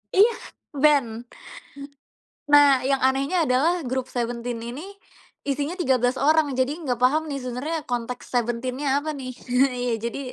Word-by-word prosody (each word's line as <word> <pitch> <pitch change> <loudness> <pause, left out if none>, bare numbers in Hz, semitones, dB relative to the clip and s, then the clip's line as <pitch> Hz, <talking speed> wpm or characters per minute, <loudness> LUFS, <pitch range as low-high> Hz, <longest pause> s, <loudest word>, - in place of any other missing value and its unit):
Iya, 420 +5 +6 0.5
ben. 245 -6 +2 1.2
Nah, 285 -3 +6
yang 270 +1 +1
anehnya 275 +6 +1
adalah 305 +5 +1
grup 260 +1 -3
Seventeen 240 0 -3
ini 240 +5 -7 0.6
isinya 285 +4 -1
13 255 -5 +1
orang, 310 0 +3
jadi 260 0 +2
nggak 250 -6 -2
paham 275 +6 +3
nih 280 - -3
sebenernya 255 +6 -3
konteks 245 0 -4
Seventeen-nya 250 +4 0
apa 305 +2 -4
nih. 265 -2 -6 0.5
Iya, 245 -1 -1
jadi 235 +3 -3
260 Hz, 135 wpm, -24 LUFS, 245-290 Hz, 1.2 s, Iya